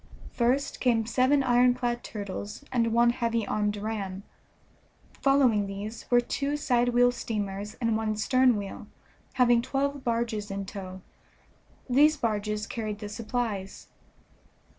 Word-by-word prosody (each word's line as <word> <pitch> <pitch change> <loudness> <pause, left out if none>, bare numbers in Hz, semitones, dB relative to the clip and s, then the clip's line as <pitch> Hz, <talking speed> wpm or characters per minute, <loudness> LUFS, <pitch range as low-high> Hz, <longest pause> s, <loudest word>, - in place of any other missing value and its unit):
First 255 +4 0
came 230 -3 +2
seven 260 +4 +2
ironclad 245 -1 +2
turtles 205 +3 -6
and 230 -3 +1
one 235 +1 +4
heavy 230 -2 -1
armed 210 0 -1
ram; 200 -2 -4 1.0
following 255 -7 +3
these 205 +3 -7
were 245 - +5
two 280 +4 -2
side 245 -4 +2
wheel 245 0 +4
steamers 210 -3 -4
and 230 -3 0
one 220 -1 -1
stern 255 +2 +3
wheel, 200 -1 -7 0.5
having 240 -2 +4
twelve 275 +2 -2
barges 230 -3 -1
in 195 0 -4
tow; 185 -1 -8 0.8
these 295 +4 +4
barges 210 -3 -1
carried 215 -1 -4
the 210 0 -7
supplies. 215 -3 -4
230 Hz, 125 wpm, -27 LUFS, 210-250 Hz, 1.0 s, were